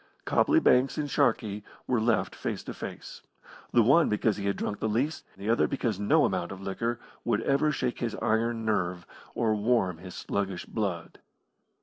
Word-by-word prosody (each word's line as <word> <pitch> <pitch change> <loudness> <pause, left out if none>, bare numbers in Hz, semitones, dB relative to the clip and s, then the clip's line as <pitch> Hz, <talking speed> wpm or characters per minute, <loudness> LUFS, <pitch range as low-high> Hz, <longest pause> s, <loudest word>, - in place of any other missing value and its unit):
Copley 320 +1 +4
Banks 130 - +3
and 150 - -1
Sharkey 110 -6 +1 0.2
were 125 -3 +1
left 110 -5 +1
face - - -4
to - - -6
face, - - -8 0.5
the 120 - +5
one 140 +9 +5
because 105 0 +1
he 100 -1 -3
had 100 - +1
drunk 105 - -3
the 110 - -1
least, 135 +8 -1
the 100 +2 -7
other 115 +1 +3
because 115 -7 -2
no 150 +10 +4
amount 90 -2 -1
of 95 - -7
liquor 110 +5 -2 0.2
would 115 -2 +1
ever 140 +2 +2
shake 125 -3 -2
his 115 -2 -2
iron 115 +1 0
nerve 90 -5 -1 0.3
or 110 -2 +2
warm 105 -5 +1
his 90 0 -9
sluggish 95 -2 -3
blood. 95 -7 -4
110 Hz, 180 wpm, -28 LUFS, 100-120 Hz, 0.5 s, the